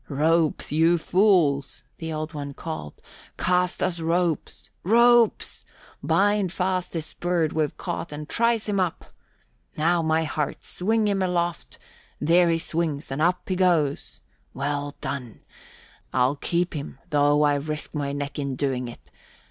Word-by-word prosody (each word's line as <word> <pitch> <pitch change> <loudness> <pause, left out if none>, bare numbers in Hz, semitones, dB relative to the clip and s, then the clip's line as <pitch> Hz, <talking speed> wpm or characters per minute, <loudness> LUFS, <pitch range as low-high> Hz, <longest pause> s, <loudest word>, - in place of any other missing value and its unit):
"Ropes, 160 +2 +1
you 165 +3 +4
fools!" 170 -7 +2 0.2
the 160 -1 -4
Old 155 +1 -4
One 140 -2 -6
called. 155 - -7 0.4
"Cast 180 0 +1
us 175 -2 0
ropes! 165 0 -1
Ropes! 235 +3 +4 0.4
Bind 205 -2 +2
fast 185 -1 -1
this 160 -2 -3
bird 175 -3 0
we've 155 -2 -1
caught 170 - -4
and 150 0 -6
trice 230 +1 +1
him 200 -2 0
up! 180 -3 -2 0.6
Now, 170 +2 +2
my 160 0 +1
hearts, 155 -2 -3
swing 215 +3 +1
him 200 -1 +1
aloft 175 -2 -2 0.4
there 170 +4 +4
he 165 - +2
swings 160 -4 -2
and 135 +3 -2
up 175 +3 +1
he 185 - 0
goes! 170 -6 +1 0.3
Well 145 +1 -2
done! 125 -5 -5 0.7
I'll 130 +2 +2
keep 175 +4 -1
him 140 -3 -6
though 145 0 +4
I 145 -1 +4
risk 150 +2 -3
my 145 -2 -2
neck 145 +1 -4
in 140 -2 -2
doing 130 -2 -1
it. 120 - -12
160 Hz, 145 wpm, -25 LUFS, 145-180 Hz, 0.7 s, you